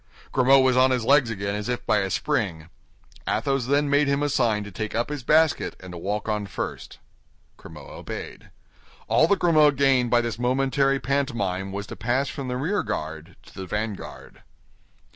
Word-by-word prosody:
Grimaud 135 Hz, +1 st, +5 dB
was 130 Hz, -1 st, +3 dB
on 130 Hz, +1 st, +5 dB
his 125 Hz, -3 st, 0 dB
legs 140 Hz, -2 st, +4 dB
again 100 Hz, -2 st, -3 dB
as 105 Hz, +3 st, -4 dB
if 125 Hz, -, -3 dB
by 105 Hz, -, +3 dB
a 95 Hz, -1 st, -1 dB
spring. 80 Hz, -2 st, -2 dB, 0.6 s
Athos 135 Hz, -3 st, 0 dB
then 145 Hz, +2 st, +2 dB
made 145 Hz, +1 st, +3 dB
him 140 Hz, +1 st, +1 dB
a 145 Hz, -, +1 dB
sign 110 Hz, -6 st, +1 dB
to 105 Hz, -, -9 dB
take 110 Hz, +4 st, -5 dB
up 120 Hz, +4 st, 0 dB
his 145 Hz, -2 st, -4 dB
basket 155 Hz, +4 st, +2 dB
and 95 Hz, -1 st, -10 dB
to 90 Hz, -, -7 dB
walk 105 Hz, +4 st, -3 dB
on 105 Hz, -2 st, -2 dB
first. -, -, -6 dB, 0.6 s
Grimaud 75 Hz, -3 st, -12 dB
obeyed. -, -, -8 dB, 0.6 s
All 160 Hz, -, +4 dB
that 200 Hz, -, +3 dB
Grimaud 155 Hz, -5 st, +4 dB
gained 135 Hz, -3 st, +3 dB
by 120 Hz, 0 st, +4 dB
this 115 Hz, -2 st, -4 dB
momentary 135 Hz, +2 st, +1 dB
pantomime 110 Hz, -10 st, -2 dB
was 100 Hz, +1 st, -5 dB
to -, -, -8 dB
pass 130 Hz, +5 st, -1 dB
from 135 Hz, -2 st, -6 dB
the 125 Hz, 0 st, -2 dB
rear 175 Hz, +10 st, 0 dB
guard 80 Hz, +3 st, -5 dB
to -, -, -17 dB
the 95 Hz, -1 st, -7 dB
vanguard. 105 Hz, +1 st, -6 dB
125 Hz, 185 wpm, -24 LUFS, 105-140 Hz, 0.6 s, Grimaud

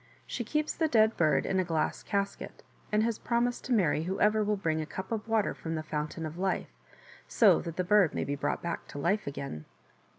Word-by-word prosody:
She 240 Hz, -, -4 dB
keeps 300 Hz, +6 st, -1 dB
the 320 Hz, -, +1 dB
dead 220 Hz, -5 st, +4 dB
bird 155 Hz, -2 st, +2 dB
in 190 Hz, -, +1 dB
a -, -, +3 dB
glass 165 Hz, -3 st, -1 dB
casket, 200 Hz, -1 st, -3 dB, 0.3 s
and 215 Hz, 0 st, +3 dB
has 230 Hz, -1 st, -1 dB
promised 240 Hz, +1 st, 0 dB
to 255 Hz, -, -5 dB
marry 165 Hz, -8 st, +2 dB
whoever 210 Hz, +3 st, +2 dB
will 210 Hz, 0 st, 0 dB
bring 160 Hz, -4 st, 0 dB
a -, -, -3 dB
cup 190 Hz, +5 st, -7 dB
of 225 Hz, -1 st, -3 dB
water 220 Hz, -2 st, +1 dB
from 165 Hz, 0 st, -5 dB
the 155 Hz, -, -3 dB
Fountain 155 Hz, +1 st, -4 dB
of 155 Hz, +3 st, -7 dB
Life, 190 Hz, 0 st, -1 dB, 0.5 s
so -, -, +5 dB
that 165 Hz, -2 st, -6 dB
the 185 Hz, -, 0 dB
bird 200 Hz, -2 st, +4 dB
may -, -, 0 dB
be 145 Hz, -, -2 dB
brought 140 Hz, -, -2 dB
back 170 Hz, 0 st, -4 dB
to -, -, -9 dB
life 200 Hz, +8 st, 0 dB
again." 140 Hz, -, -5 dB
190 Hz, 220 wpm, -30 LUFS, 160-220 Hz, 0.5 s, so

